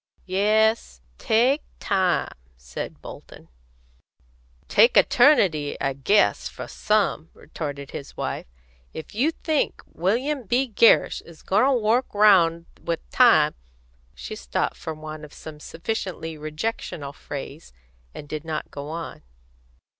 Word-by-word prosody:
"Yes; 215 +4 +1 0.2
take 245 +5 +2 0.2
time," 185 -4 0 0.2
said 60 0 -8
Bolton. - - -12 1.2
"Take - - +5
eternity, 190 - +4
I 135 -1 -1
guess, 195 +11 +2
for - - -8
some," 205 -7 0
retorted 145 -3 -7
his 140 - -8
wife. - - -4 0.5
"If 160 - -8
you 255 +9 +2
think 315 -2 -2
William 245 - -1
B. 255 +6 +2
Gerrish 230 0 +4
is 170 -2 -16
goin' 205 +6 +3
to 275 - +3
work 235 0 +1
round 170 -5 +5 0.2
with 170 - -3
time - - +5 0.3
" 60 +2 -36
She 60 - -7
stopped - - -2
for 160 - -6
want 155 0 -8
of 150 - -12
some 155 -1 -10
sufficiently 165 -1 -5
rejectional 155 -2 -5
phrase, 145 +2 -8 0.4
and 145 - -10
did 155 0 -5
not 160 -2 -5
go 145 +1 -7
on. 165 +1 -6
170 Hz, 125 wpm, -24 LUFS, 150-220 Hz, 1.2 s, Take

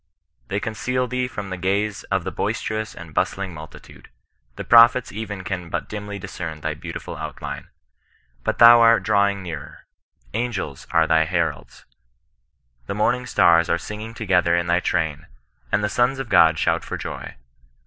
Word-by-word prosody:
They 100 - -2
conceal 125 +4 -2
thee 125 +1 -2
from 100 -6 -7
the 95 - -3
gaze 100 +3 -1
of 95 -3 -1
the 95 - -4
boisterous 110 +1 -3
and 85 -2 -11
bustling 95 +3 -1
multitude. 80 0 -12 0.5
The - - -6
prophets 120 +1 +6
even 105 -3 -6
can 90 -3 -4
but - - -3
dimly 105 -1 -6
discern 80 -5 -7
thy 80 0 -2
beautiful 75 - -7
outline. - - -6 0.8
But - - -1
thou 120 0 +9
art 115 0 +5
drawing 100 -1 +2
nearer. 80 -5 -8 0.5
Angels 115 - -3
are 80 -1 +3
thy 80 -1 +3
hendds. 85 -1 -3 1.0
The 100 - -3
morning 125 +4 0
stan 85 -6 +4
are 85 - +2
singing 105 +5 -8
together 90 -6 +2
in 85 0 0
thy 85 0 +2
train, 80 -2 -2 0.4
and 105 - +1
the - - +2
sons 120 +5 +1
of 135 -3 -5
GU)d 80 -4 +5
shout - - +1
for - - -5
joy. - - -7
100 Hz, 160 wpm, -22 LUFS, 85-110 Hz, 1.0 s, thou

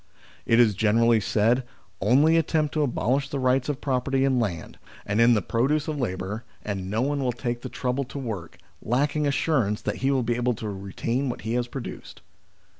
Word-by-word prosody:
It 115 - +4
is 115 -3 +5
generally 115 +3 +3
said, 115 +5 +2 0.2
" 95 - -36
Only 140 +10 +4
attempt 160 -2 +1
to 155 - +1
abolish 135 0 0
the 140 - -3
rights 130 +1 +1
of 145 -1 -3
property 135 0 +1
in 130 -2 +2
land, 95 -8 -3 0.3
and 105 +3 +1
in 120 0 +6
the 105 - 0
produce 145 +6 0
of 155 -2 -3
labour, 105 -1 -3 0.2
and 95 -3 -3
no 110 +4 0
one 140 0 -1
will 125 - +1
take 120 0 -4
the 130 - -6
trouble 130 +2 -2
to 125 - -9
work, 105 -11 -5 0.2
lacking 145 +5 0
assurance 130 -7 +1
that - - -2
he 135 - 0
will 135 -2 +2
be 120 0 0
able 120 0 +1
to 110 - -6
retain 105 +7 -3
what 120 - -5
he 110 +1 -3
has 120 0 0
produced." 125 0 -8
125 Hz, 200 wpm, -25 LUFS, 110-135 Hz, 0.3 s, in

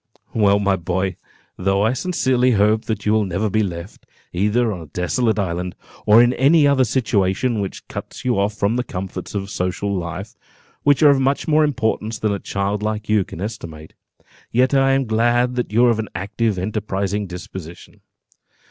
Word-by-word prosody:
"Well, 100 -2 +4
my 100 -1 +1
boy, 95 +1 -2 0.4
though 95 +2 +1
I 110 +3 +2
sincerely 130 -5 +1
hope 105 +1 +2
that 110 -3 -3
you 105 - +2
will 110 -1 +3
never 95 +3 -2
be 110 - +2
left, 85 -1 -6 0.3
either 105 +5 +1
on 90 - -7
a - - -9
desolate 110 - 0
island, 90 -2 -2 0.3
or 110 +3 +8
in 120 +1 +3
any 145 +4 +4
other 135 -2 +3
situation 110 -1 0
which 95 - -6
cuts - - -8
you 120 -5 +1
off 100 +1 0
from 105 +3 0
the 125 - 0
comforts 95 -1 -6
of 100 0 -3
social 95 +2 -2
life, 90 +3 -5 0.5
which 145 +1 +3
are 145 - +8
of 140 - +2
much 135 +2 0
more 155 0 +4
importance 115 -5 -1
than 110 -2 0
a 100 - -3
child 100 +2 -2
like 110 0 -3
you 105 -2 +3
can 90 - -10
estimate, 85 -8 -7 0.6
yet 130 +3 +2
I 135 0 +4
am 135 0 +1
glad 120 +2 +2
that 125 -4 -2
you 120 +3 +4
are 120 - +5
of 110 - -1
an 110 - -3
active, 100 +3 -1
enterprising 100 0 -2
disposition. 90 -1 -10
105 Hz, 185 wpm, -20 LUFS, 95-120 Hz, 0.6 s, or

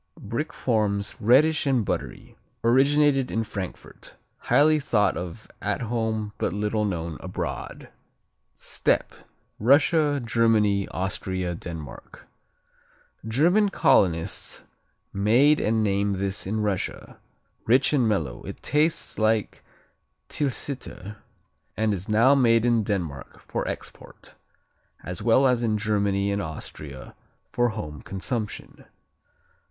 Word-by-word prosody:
Brick 115 +9 -4
forms, 105 -4 -1
reddish 145 +7 +4
and 130 -6 +2
buttery. - - -5 0.3
Originated 135 +2 +3
in 115 - -1
Frankfurt. 100 -4 -8 0.2
Highly 155 +1 +4
thought 105 -8 +1
of 85 -1 -7
at - - -2
home 110 -2 -2
but - - -1
little 105 +1 -1
known 85 -5 -3
abroad. - - -5 0.7
Steppe - - -1 0.5
Russia, 145 +4 +3
Germany, 110 -4 +2
Austria, 95 -1 -3
Denmark 80 -4 -9 1.0
German 175 - +3
colonists 90 - +1 0.5
made 120 +10 +4
and 110 0 +1
named 100 0 +1
this 95 0 -3
in 110 +2 -1
Russia. 100 -3 -3 0.5
Rich 130 +6 +4
and 125 -6 +3
mellow, 75 - -2
it - - -9
tastes 155 -2 0
like 110 -1 0 0.7
Tilsiter 130 -7 -4 0.6
and 110 -1 +1
is 95 +2 -5
now 115 +6 +5
made 115 -4 +4
in 120 -2 +3
Denmark 85 -10 -4
for - - -4
export, - - -9 0.7
as 90 +2 -6
well 120 +5 +4
as 125 -2 +3
in 110 -2 +1
Germany 100 -1 0
and 100 0 -1
Austria 75 -4 -8 0.4
for 120 0 +2
home 75 - -6
consumption. 105 +3 -5
110 Hz, 110 wpm, -25 LUFS, 100-125 Hz, 1.0 s, now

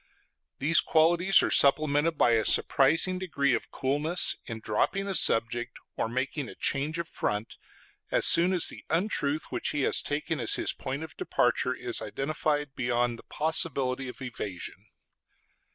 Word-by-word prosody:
These 155 +4 +3
qualities 175 +4 +3
are - - -1
supplemented 145 +2 +3
by 120 - +3
a 115 -1 +2
surprising 165 - +2
degree 140 -7 0
of - - -3
coolness 145 +6 0
in 115 -3 -6
dropping 180 - -1
a 195 - -2
subject 120 -5 +1 0.2
or - - -2
making 130 +3 -3
a - - -11
change 145 +4 -2
of 170 -1 -4
front, 105 +2 -4 0.5
as - - +3
soon 175 +2 +7
as 180 -3 +2
the - - -11
untruth 160 -4 -1
which - - -2
he 145 - -2
has - - +1
taken 150 +1 -3
as 115 - +3
his - - -2
point 135 +4 -5
of 160 - -10
departure 370 - 0
is 370 -2 -4
identified 150 0 -2
beyond 120 -1 -1
the - - -14
possibility 135 -4 -1
of 130 - -10
evasion. 105 -7 -7
145 Hz, 155 wpm, -27 LUFS, 125-165 Hz, 0.5 s, soon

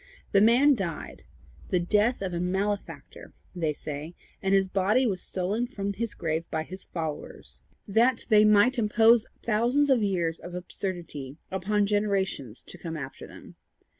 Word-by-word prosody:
The 200 - +5
man 250 +7 +6
died 165 - -5 0.4
the 180 - +2
death 210 +6 +1
of 185 -2 -3
a 170 - -2
malefactor, 195 +3 -3 0.2
they 165 -3 0
say; 150 +3 -6 0.3
and 195 - 0
his 195 -1 +4
body 200 +7 +2
was 195 -6 0
stolen 200 +6 -2
from 200 -5 -4
his 230 +2 -4
grave 160 -1 -2
by 160 0 -2
his 185 +4 -9
followers, 160 -3 -6 0.3
that 230 +4 +2
they 215 -2 +6
might 215 +4 +4
impose 225 +1 +4 0.2
thousands 240 +6 +2
of 250 -4 +4
years 175 -5 0
of 175 0 -9
absurdity 175 -6 -5
upon 200 +2 +1
generations 195 - -1
to - - -11
come 165 -2 -5
after 135 -3 -8
them. - - -14
195 Hz, 155 wpm, -27 LUFS, 175-215 Hz, 0.4 s, man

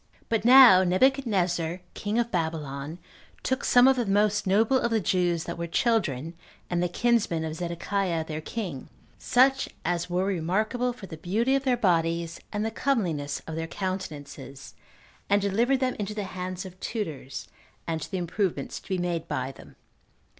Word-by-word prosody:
1. - - -30
But 225 -1 0
now 245 -7 +9
Nebuchadnezzar, 185 - +1
king 210 +1 -2
of 235 0 0
Babylon, 155 -3 -3 0.5
took 260 - -1
some 245 +1 +6
of 265 -1 +4
the 240 -3 0
most 205 +1 +2
noble 220 +7 +3
of 235 - 0
the 225 -1 +2
Jews 175 -4 +1
that 170 0 -6
were 170 - -3
children, 170 - 0 0.4
and 175 -1 +1
the 180 - 0
kinsmen 200 -6 +1
of 155 - -4
Zedekiah 170 0 -2
their 155 -1 -5
king, 175 - -5 0.3
such 265 +2 +3 0.2
as 175 0 -1
were 180 +2 0
remarkable 200 +7 0
for 235 -5 -10
the 160 -4 -9
beauty 215 +11 0
of 275 0 +1
their 250 -2 +2
bodies, 170 -4 +1
and 210 0 -2
the 225 - -1
comeliness 175 - -1
of 160 - -6
their 165 +1 -3
countenances, 155 -7 -6 0.6
and 200 +1 +4
delivered 230 +7 +1
them 255 -1 0
into 210 0 -3
the 210 - -2
hands 185 0 -5
of 185 0 -11
tutors, 160 - -5 0.4
and 165 -1 -2
to - - -6
the 190 - -3
improvement 175 -4 -2
to - - -8
be 190 - 0
made 175 -2 -2
by 130 -2 -2
them. - - -15
185 Hz, 175 wpm, -27 LUFS, 165-225 Hz, 0.6 s, now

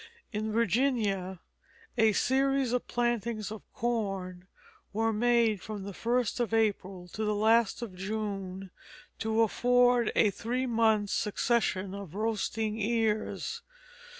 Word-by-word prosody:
In 215 +1 -2
Virginia 210 -5 0 0.5
a 220 -3 +4
series 270 +1 +2
of 250 - -1
plantings 235 -3 -1
of 220 - -7
corn 195 -6 -3 0.5
were 225 +1 +1
made 230 -2 +2
from 210 -2 -6
the 200 0 -6
first 240 +3 0
of 225 -2 0
April 195 -4 0
to 215 +5 -4
the 210 0 0
last 225 +1 +3
of 215 -5 -6
June, 195 -1 -4 0.5
to 220 +1 +2
afford 245 +1 +3
a 210 - +4
three 245 +6 -2
months' 220 -4 +2
succession 205 -3 0
of 195 -4 -8
roasting 220 0 -1
ears. 220 0 -1
220 Hz, 125 wpm, -30 LUFS, 200-235 Hz, 0.5 s, a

